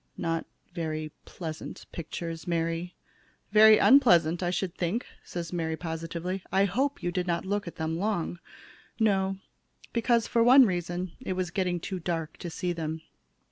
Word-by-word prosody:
Not 165 0 -2 0.3
very 155 -3 -3
pleasant 160 -3 -7
pictures, 165 0 -6
Mary." 165 +1 -1 0.6
"Very 215 0 +8
unpleasant, 175 - +5
I 175 - 0
should 180 0 -2
think," 185 +8 -1 0.2
says 170 0 -6
Mary, 160 -2 -1
positively. 165 +3 -4
"I 195 +1 +4
hope 265 +9 -1
you 175 - 0
didn't 175 -1 -1
look 205 0 -1
at 170 - -7
them 160 +1 -2
long." 195 -4 -1 0.6
"No, 195 -3 +2 0.6
because, 235 0 +2
for 235 - +1
one 255 +3 +8
reason, 175 -2 -2
it 245 -7 -3
was 185 -1 -2
getting 180 -2 0
too 185 +2 -4
dark 165 -2 -3
to 175 - -6
see 175 +2 -2
them. 160 -1 -4
175 Hz, 150 wpm, -28 LUFS, 165-195 Hz, 0.6 s, Very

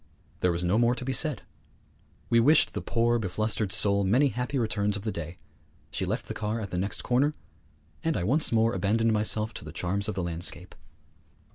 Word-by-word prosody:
There 90 - +2
was 85 +1 -2
no 90 +5 +2
more 120 +1 +3
to 125 - -6
be 135 - -1
said. 150 -3 0 0.8
We 115 - +4
wished 145 +7 +4
the - - -3
poor 120 0 +1
beflustered 110 +1 -1
soul 100 -1 +3
many 125 +9 +3
happy 125 +4 -3
returns 105 -3 0
of 100 - -8
the 110 - -2
day; 85 0 -6 0.5
she - - -2
left - - -2
the - - -4
car 110 +2 -2
at 100 -4 -6
the 90 - -2
next 100 +3 -2
corner; 140 +5 +2 0.7
and 165 -1 0
I 85 - -1
once 140 - +2
more 115 0 +3
abandoned 110 +4 +1
myself 110 +1 +1
to - - -8
the - - -8
charms 100 +4 -1
of 105 - -3
the 95 - -2
landscape. 85 0 -5
110 Hz, 205 wpm, -27 LUFS, 100-120 Hz, 0.8 s, We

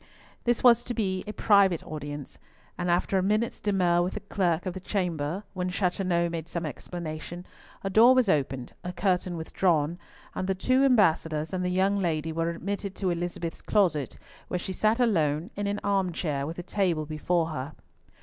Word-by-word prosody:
This 240 -1 +1
was 240 -2 +6
to 240 - -4
be 190 -4 -1
a - - -3
private 200 -5 +4
audience, 145 -2 -7 0.4
and 180 0 -2
after 180 +2 +2
a - - +1
minute's 215 +4 0
demur 180 -4 +2
with 180 +1 -2
the - - -3
clerk 180 -4 0
of 185 - -2
the 190 - -6
chamber, 180 -2 -2
when 180 -1 -2
Chateauneuf 180 -2 0
made 165 -1 -4
some 170 -1 -3
explanation, 170 +3 -6 0.4
a 195 - -1
door 235 +5 +7
was 255 -4 +4
opened, 135 -7 0
a 180 - -4
curtain 180 -2 0
withdrawn, 165 0 0 0.3
and 185 - -3
the 190 - +1
two 255 +7 +2
ambassadors 165 - +2
and 185 -1 -1
the 180 - 0
young 190 +2 +2
lady 160 -3 -1
were 165 +1 0
admitted 195 +3 -4
to 190 -3 0
Elizabeth's 170 -1 -4
closet, 165 - +1 0.3
where 180 - -2
she 185 +2 -4
sat 215 +5 +2
alone, 165 -6 +1
in 205 0 -2
an 205 +1 -1
arm 195 -3 +1
chair 145 -4 -2
with 165 - -6
a 175 - -5
table 175 -5 0
before 160 +2 0
her. 150 -1 -5
180 Hz, 185 wpm, -27 LUFS, 160-200 Hz, 0.4 s, door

